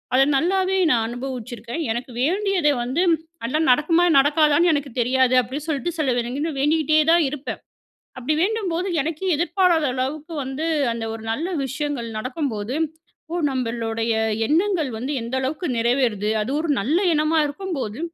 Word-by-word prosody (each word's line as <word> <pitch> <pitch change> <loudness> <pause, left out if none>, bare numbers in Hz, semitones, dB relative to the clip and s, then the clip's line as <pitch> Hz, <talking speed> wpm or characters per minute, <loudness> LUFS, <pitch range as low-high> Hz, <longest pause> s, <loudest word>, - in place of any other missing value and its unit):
அத 270 - +6
நல்லாவே 375 +4 +1
நா 250 - +4
அனுபவிச்சிருக்கே. 240 -2 -6 0.2
எனக்கு 245 +2 -4
வேண்டியதை 365 -1 +2
வந்து, 260 +8 -1 0.4
ஆனா 260 +7 0
நடக்குமா 325 +6 +3
நடக்காதான்னு 300 +4 +4
எனக்கு 285 -2 -2
தெரியாது. 255 +1 +2
அப்டின்னு 275 +4 -6
சொல்ட்டு 310 +4 -1
சில 280 -5 +1 0.3
தின 320 +3 -1
வேண்டிகிட்டே 310 +1 +2
தான் 340 -1 +5
இருப்ப. 290 0 -8 0.7
அப்டிவேண்டும்போது, 355 - 0 0.2
எனக்கே 325 +5 -4
எதிர்பாராதளவுக்கு 310 -4 0
வந்து 270 +5 -4 0.3
அந்த 230 -1 -4
ஒரு 225 - -8
நல்ல 320 +9 -2 0.2
விஷயங்கள் 270 -3 -3
நடக்கும்போது, 250 -2 -3 0.6
ஓ! - - -1 0.2
நம்மளுடைய 230 -3 -2 0.3
எண்ணங்கள் 330 -2 +1
வந்து 265 +5 -3
எந்த 235 +3 -5
அளவுக்கு 300 +7 -3
நிறைவேறுது. 230 -3 +1
அது 220 - -4
ஒரு 325 -2 -2
நல்ல 285 +11 +1 0.2
எண்ணமா 310 +2 +2
இருக்கும்போது, 290 - -4
290 Hz, 130 wpm, -22 LUFS, 250-325 Hz, 0.7 s, அத